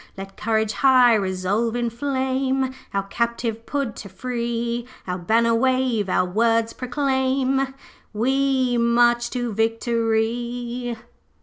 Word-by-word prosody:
'Let 195 0 -8
courage 220 -1 0
high 255 -3 +5
resolve 200 +3 0
inflame 260 +2 -1 0.2
Our 195 0 -1
captive 230 +2 -2
Pud 275 -6 -2
to 200 - -8
free; 235 +2 -3 0.2
Our 180 0 -3
banner 230 +6 +2
wave, 255 -4 +1
our 185 - +2
words 225 +4 +1
proclaim 265 0 0 0.4
We 260 +1 +1
march 240 0 +3
to 245 -3 -3
victory!' 235 +2 -1
235 Hz, 105 wpm, -23 LUFS, 225-260 Hz, 0.4 s, high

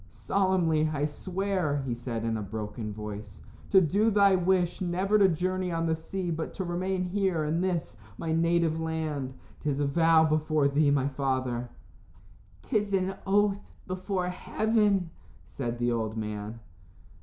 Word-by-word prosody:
"Solemnly 170 - +1
I 145 -1 0
swear," 180 -2 -1
he 125 - -1
said, 115 -1 -4
in 115 -1 0
a 110 - -2
broken 105 +1 -5
voice, 105 0 -7 0.3
"to 195 - +7
do 200 +6 +3
thy 200 -2 +5
wish 180 -1 +1
never 190 +4 +1
to 195 - +7
journey 185 +2 -1
on 165 0 -1
the 160 - +2
sea, 175 +2 -4
but 160 0 -4
to 190 - -2
remain 185 +1 -1
here 185 -3 0
in 155 +3 0
this, 170 - -2 0.2
my 165 - -3
native 165 -1 +2
land. 155 -5 -3 0.3
'Tis 145 -2 -1
a 145 - +2
vow 160 +2 +4
before 155 -1 +2
thee, 145 +1 +3
my 140 -1 +2
father." 130 -3 -1 0.9
"'Tis 210 -1 0
an 190 0 +1
oath 200 0 +1
before 185 0 -2
heaven," 205 -1 +1 0.3
said 120 -3 -4
the 120 0 +1
old 110 -1 -2
man. 105 +1 -4
165 Hz, 155 wpm, -28 LUFS, 135-185 Hz, 0.9 s, to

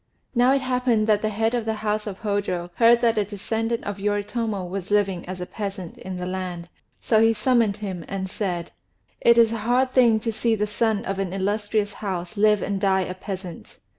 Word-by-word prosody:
Now 245 +1 +4
it 275 - +1
happened 250 -4 +1
that 210 -1 +3
the 215 - 0
head 225 +2 0
of 240 -2 -1
the 220 0 -1
house 210 0 0
of 195 -2 -6
Hôjô 195 -4 -1
heard 235 0 +6
that 230 -2 +3
a - - +2
descendant 225 +3 -2
of 205 -1 -5
Yoritomo 205 0 -1
was 190 +1 -5
living 195 -4 +1
as 185 0 -5
a 180 - -4
peasant 195 -4 -6
in 185 -1 -6
the 180 - -4
land, 180 -2 -4 0.3
so 220 -2 +3
he 225 0 +5
summoned 230 -4 +2
him 190 -5 -5
and 190 -1 -3
said: 180 -3 -3 0.5
"It 235 0 +5
is 230 -1 +6
a 230 - -2
hard 245 +4 +1
thing 235 -4 +5
to 225 0 -2
see 225 +1 +1
the 210 -1 0
son 215 +1 0
of 195 0 -3
an 190 -2 -2
illustrious 205 +1 -1
house 190 -1 -4
live 210 0 +3
and 195 -1 -2
die 190 -1 +3
a 185 0 -3
peasant. 185 -2 -8
210 Hz, 210 wpm, -24 LUFS, 190-225 Hz, 0.5 s, heard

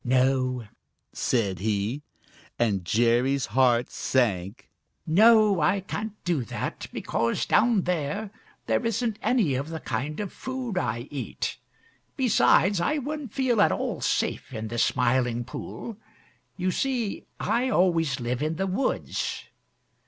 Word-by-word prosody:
"No," 130 -2 +1 0.5
said 100 -7 0
he, 105 +6 -1 0.6
and 105 -6 +1
Jerry's 120 +7 +2
heart 125 -2 +3
sank. 105 -6 0 0.4
"No, 215 +3 +5
I 190 +6 +2
can't 210 +2 -4
do 170 -7 0
that - - -5
because 115 +1 -1
down 215 -3 +3
there 180 +5 -2 0.3
there - - +1
isn't 230 -1 -1
any 220 - +2
of 135 +4 -2
the 160 -1 -5
kind 140 +4 -3
of 205 -3 -4
food 260 -5 -5
I 120 -10 -1
eat. 140 -3 -4 0.6
Besides, 205 -6 +4
I 300 - +1
wouldn't 290 -3 -4
feel 245 -4 +2
at - - +5
all - - -2
safe - - -1
in 110 -3 -5
the 120 +1 -3
Smiling 120 -1 +2
Pool. 215 - -7 0.6
You 185 +1 0
see, 245 -2 -2
I 250 +2 +1
always 170 - +2
live 120 +1 -2
in 155 +2 -1
the 190 - -1
woods. 195 +8 -2
155 Hz, 130 wpm, -26 LUFS, -, 0.6 s, No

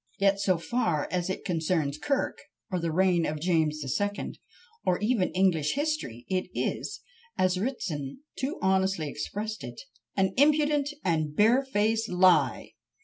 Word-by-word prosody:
Yet, 195 0 +3
so 190 -3 +2
far 170 -5 0
as 180 0 -1
it 190 - -4
concerns 160 -4 0
Kirk, 275 - -1 0.3
or 180 - 0
the 165 -1 -1
reign 180 0 +3
of 155 -1 -2
James 160 -2 +1
the 140 - -5
Second, 205 +9 -2 0.4
or 180 - +2
even 210 -3 +1
English 180 -5 +2
history, 285 - -2
it 185 -1 -1
is, - - -2 0.4
as 185 0 +2
Ritson 195 - -3
too 270 +3 -3
honestly 190 -3 +2
expresses 210 +9 -4
it, 120 - -8 0.4
"an 190 -1 +2
impudent 295 0 +3 0.2
and 165 -3 +2
a - - -9
bare 220 - +4
faced 225 -3 0
lie!" 180 -7 +3
185 Hz, 150 wpm, -28 LUFS, 160-220 Hz, 0.4 s, bare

